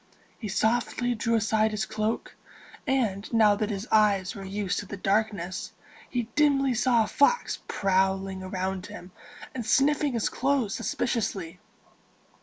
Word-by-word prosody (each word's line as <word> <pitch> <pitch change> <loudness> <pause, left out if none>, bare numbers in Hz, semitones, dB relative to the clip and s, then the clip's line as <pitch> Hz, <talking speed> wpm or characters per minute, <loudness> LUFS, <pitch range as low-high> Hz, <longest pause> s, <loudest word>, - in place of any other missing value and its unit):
He 220 - -5
softly 240 +4 0
drew 230 0 0
aside 220 0 +2
his 215 0 -2
cloak, 215 +1 -3 0.5
and, 220 -7 0
now 220 -3 +5
that 210 +1 -1
his 205 +1 -4
eyes 200 -3 +3
were 195 - -8
used 195 0 -2
to 205 - -7
the 200 - -6
darkness, 195 -2 -1 0.4
he 245 -2 -1
dimly 280 -3 +3
saw 240 -1 +3
a - - -4
fox 480 - +2
prowling 190 -1 0
around 185 0 -3
him, 205 -3 -10 0.4
and 255 - -4
sniffing 290 +3 +2
his 230 -3 0
clothes 265 -5 0
suspiciously. 195 -8 -2
215 Hz, 140 wpm, -27 LUFS, 195-240 Hz, 0.5 s, now